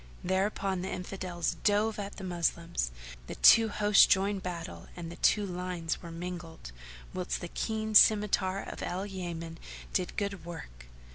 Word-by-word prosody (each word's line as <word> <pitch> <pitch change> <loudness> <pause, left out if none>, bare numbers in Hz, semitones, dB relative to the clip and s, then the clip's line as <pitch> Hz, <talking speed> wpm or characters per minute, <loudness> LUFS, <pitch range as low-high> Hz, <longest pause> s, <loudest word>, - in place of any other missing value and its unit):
Thereupon 190 0 0
the 190 - -4
Infidels 180 -1 -3
drove 210 +1 +2
at 200 0 -5
the 195 - -8
Moslems; 170 - -1 0.4
the - - -6
two 225 -1 +7
hosts 210 -1 +5
joined 195 0 +2
battle 170 -2 -6
and 170 -1 -7
the - - -8
two 210 -1 +3
lines 180 -3 -3
were 170 - -8
mingled, 165 - -7 0.4
whilst 180 -1 -2
the 175 - -5
keen 220 +4 -3
scymitar 205 -2 +5
of - - -8
Al 185 +3 -3
Yaman 170 -4 -6 0.3
did 180 - -1
good 200 -3 -2
work. - - -9
185 Hz, 150 wpm, -30 LUFS, 170-200 Hz, 0.4 s, two